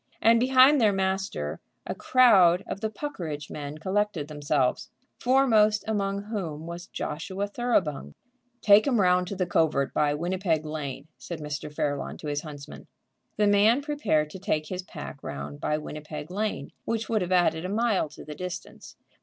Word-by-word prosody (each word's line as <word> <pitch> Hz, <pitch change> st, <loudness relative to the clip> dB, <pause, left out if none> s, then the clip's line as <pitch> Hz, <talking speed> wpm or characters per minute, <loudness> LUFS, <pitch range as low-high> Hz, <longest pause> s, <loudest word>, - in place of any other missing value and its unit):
And 230 Hz, +1 st, +5 dB
behind 260 Hz, +3 st, +6 dB
their 215 Hz, -2 st, +5 dB
master 190 Hz, -, -2 dB, 0.3 s
a -, -, -3 dB
crowd 195 Hz, -9 st, +5 dB
of 195 Hz, -, -6 dB
the 220 Hz, -, -1 dB
Puckeridge 175 Hz, -, -6 dB
men 145 Hz, 0 st, -6 dB
collected 190 Hz, -2 st, -1 dB
themselves, 145 Hz, -3 st, 0 dB, 0.3 s
foremost 225 Hz, -5 st, +4 dB
among 200 Hz, -2 st, -1 dB
whom 175 Hz, -8 st, -5 dB
was 170 Hz, +1 st, -7 dB
Joshua 185 Hz, +6 st, -4 dB
Thoroughbung. 185 Hz, -, -1 dB, 0.5 s
"Take 205 Hz, +4 st, +6 dB
'em 250 Hz, -5 st, +2 dB
round 180 Hz, -1 st, +3 dB
to 200 Hz, -, -4 dB
the 185 Hz, -1 st, 0 dB
covert 160 Hz, -5 st, +1 dB
by 145 Hz, -1 st, +2 dB
Winnipeg 170 Hz, -1 st, -1 dB
Lane," 145 Hz, -2 st, -5 dB
said 170 Hz, -2 st, -7 dB
Mr. 150 Hz, -1 st, -5 dB
Fairlawn 145 Hz, -1 st, -2 dB
to -, -, -11 dB
his 145 Hz, 0 st, -1 dB
huntsman. 150 Hz, -2 st, -10 dB, 0.5 s
The 210 Hz, -, +3 dB
man 210 Hz, +6 st, +4 dB
prepared 275 Hz, -, 0 dB
to 190 Hz, -, -8 dB
take 155 Hz, -5 st, -1 dB
his 185 Hz, -1 st, -3 dB
pack 150 Hz, -6 st, -9 dB
round 70 Hz, 0 st, -7 dB
by 150 Hz, -, 0 dB
Winnipeg 150 Hz, +1 st, -7 dB
Lane, 210 Hz, +3 st, -3 dB
which 225 Hz, -1 st, -2 dB
would 220 Hz, -2 st, +1 dB
have 180 Hz, 0 st, -3 dB
added 170 Hz, -3 st, +3 dB
a 180 Hz, -, -3 dB
mile 210 Hz, -6 st, +1 dB
to 150 Hz, -, -12 dB
the 150 Hz, -, -7 dB
distance. 180 Hz, +3 st, -8 dB
180 Hz, 165 wpm, -27 LUFS, 150-210 Hz, 0.5 s, behind